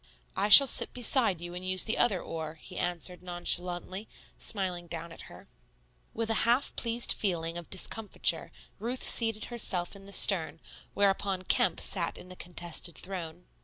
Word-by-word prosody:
"I 205 - -2
shall 275 +7 +10
sit 265 - -1
beside 235 -7 +3
you 175 0 -8
and 180 +1 -8
use 185 0 +2
the 220 - -4
other 200 -6 +1
oar," 160 -1 -7
he 180 +3 -14
answered 175 0 -3
nonchalantly, 180 +2 -3 0.3
smiling 180 -4 -4
down 170 0 -7
at - - -13
her. - - -16 0.6
With 225 0 -4
a 225 - 0
half 250 +4 0
pleased 235 0 0
feeling 170 -4 -3
of 175 -1 -8
discomfiture 205 +3 -3 0.3
Ruth 240 +5 -4
seated 225 -2 +3
herself 185 -6 -1
in 195 0 -15
the - - -13
stern, 165 -6 +7 0.4
whereupon 195 -1 0
Kemp 180 -1 0
sat 175 -4 0
in 180 - -14
the 185 - -11
contested 175 -1 -3
throne. 180 -2 -8
185 Hz, 165 wpm, -28 LUFS, 175-210 Hz, 0.6 s, shall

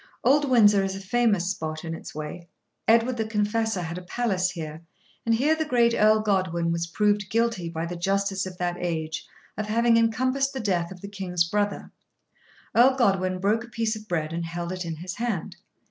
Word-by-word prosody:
Old 280 +3 +4
Windsor 205 -5 +5
is 195 0 -2
a - - -5
famous 205 -2 +1
spot 155 -3 -5
in 165 - -4
its 165 - -9
way. 155 +3 -6 0.4
Edward 235 +2 +4
the 220 - -1
Confessor 215 -2 0
had 170 +2 -4
a - - -12
palace 185 -2 0
here, 160 -3 -6 0.5
and 230 - +4
here 285 +7 +3
the 315 0 0
great 240 -5 +3
Earl 215 0 +4
Godwin 185 -5 0
was 170 0 -1
proved 205 +2 +1
guilty 230 -5 0
by 165 0 -3
the 175 +1 -5
justice 195 +2 0
of 180 -1 -9
that 175 -1 -2
age 160 -2 -3 0.3
of 215 - -2
having 230 +2 +3
encompassed 255 +4 +1
the 265 - -4
death 180 -6 0
of 180 -2 -10
the 200 - -7
King's 185 -4 -1
brother. 205 +2 -1 0.8
Earl 255 +3 +6
Godwin 195 -7 +2
broke 210 +5 +1
a - - -11
piece 225 -1 -1
of 215 0 -10
bread 160 -3 -2
and 170 0 -2
held 170 +1 -4
it 185 -1 -4
in 165 -1 -4
his 175 +2 -7
hand. 230 -7 -3
195 Hz, 200 wpm, -26 LUFS, 175-230 Hz, 0.8 s, Earl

